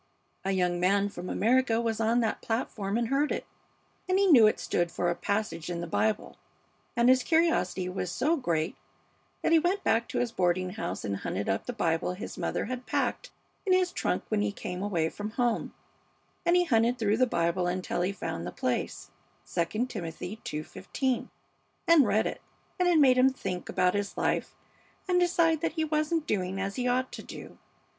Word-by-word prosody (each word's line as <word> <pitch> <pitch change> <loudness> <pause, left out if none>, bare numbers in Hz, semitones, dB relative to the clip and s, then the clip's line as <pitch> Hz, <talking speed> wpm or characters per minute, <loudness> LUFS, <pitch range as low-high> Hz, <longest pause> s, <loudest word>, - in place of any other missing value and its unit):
A 190 - -2
young 180 -2 +1
man 200 +3 +2
from 180 -2 -7
America 235 0 +2
was 225 -2 -1
on 230 +2 +2
that 225 - -1
platform 220 -3 -2
and 235 -1 -1
heard 280 +2 +1
it, - - -2 0.6
and 370 - +3
he 400 - +4
knew 255 - +8
it 215 - +1
stood 175 -1 0
for 175 0 0
a - - -2
passage 200 -5 -2
in 175 -1 -3
the 170 - -3
Bible, 215 +5 -1 0.6
and 235 0 +3
his 255 0 +6
curiosity 320 - +1
was 180 -1 -3
so 310 - +1
great 170 - -1 0.7
that - - +2
he 330 - +7
went 365 +4 0
back 230 +1 +2
to - - -4
his 245 -2 0
boarding 180 -2 0
house 215 - -4
and 100 -1 -2
hunted 100 - -3
up 95 - -1
the - - -1
Bible 175 -6 0
his 185 - -7
mother - - -2
had 255 +2 -5
packed - - -1 0.3
in 380 - +2
his 370 -1 +3
trunk - - -1
when 215 -1 +1
he 205 0 0
came 180 -2 -6
away 175 -6 0
from 205 +5 -5
home, 240 -2 0 0.8
and 345 - +5
he 360 - +5
hunted 240 -5 +2
through 215 -2 +1
the 255 +1 +4
Bible 170 -2 0
until 175 -1 -2
he 180 +2 +1
found 90 - -5
the - - -4
place, 125 +5 -3 0.4
'II 215 +8 0
Timothy 180 -1 -6
ii:15,' 245 - -3 0.6
and 320 -7 +6
read 210 +2 +2
it; - - -4 0.4
and 360 0 +3
it 345 - +4
made 260 -4 +6
him 260 +1 +6
think 190 -8 -5
about 180 0 +2
his 205 0 -3
life - - -1 0.5
and 360 -1 +3
decide 335 -3 +3
that 330 - -1
he 320 -1 0
wasn't 310 +1 0
doing 190 -4 -1
as 195 0 -3
he 250 0 0
ought 255 +1 +1
to - - -7
do. - - -10
220 Hz, 195 wpm, -29 LUFS, 180-260 Hz, 0.8 s, knew